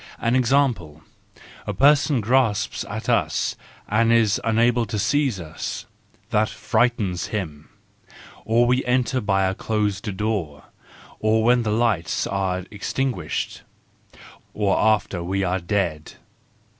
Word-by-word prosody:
An 115 +2 0
example: 120 - +1 0.6
a - - -3
person 145 -1 +4
grasps 115 -2 +1
at - - -6
us, - - +1 0.3
and 115 +2 +2
is 115 -3 +3
unable 115 +1 +2
to 105 - -3
seize 125 +1 +1
us. 80 -1 -6 0.5
That 105 0 +2
frightens 110 -5 0
him. 80 -8 -5 0.7
Or 115 +2 +3
we 125 +2 +2
enter 125 +1 +1
by 95 -2 +1
a 95 0 +1
closed 105 -1 -2
door. 100 -9 -2 0.6
Or 110 +1 +2
when 120 +1 +4
the 110 - -2
lights 105 -8 0
are 95 -2 -2
extinguished. 105 - -3 0.9
Or 105 -2 +1
after 105 -4 +1
we 95 +3 -1
are 95 +1 0
dead. 85 -4 -2
110 Hz, 120 wpm, -23 LUFS, 95-120 Hz, 0.9 s, person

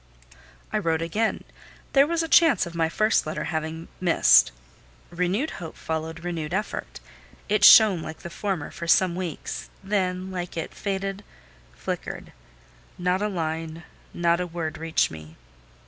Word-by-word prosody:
I - - +2
wrote 165 -1 0
again: 215 +7 -1 0.5
there 275 +1 +6
was 335 0 0
a - - -3
chance 320 - +5
of 170 - -8
my 165 -1 +1
first 215 0 +2
letter 155 - -3
having 160 0 -4
missed. 165 - +5 0.6
Renewed 180 - -1
hope 165 - -8
followed 160 +1 -4
renewed 170 -1 -3
effort: 210 - -4 0.5
it 210 0 +1
shone 210 -6 +8
like 160 0 -7
the 170 - -8
former 190 -6 -3
for 170 - -7
some 180 +1 +4
weeks, 180 -4 -5
then, 190 -2 -1
like 180 -2 -5
it, 165 - -4
it - - -18
faded, 195 0 -3 0.5
flickered: 60 - -5 0.7
not 180 +2 0
a 210 - +1
line, 165 -3 -4 0.3
not 170 0 +1
a 180 - -2
word 165 -3 -5
reached 165 0 +1
me. 80 0 -11
175 Hz, 150 wpm, -25 LUFS, 160-195 Hz, 0.7 s, shone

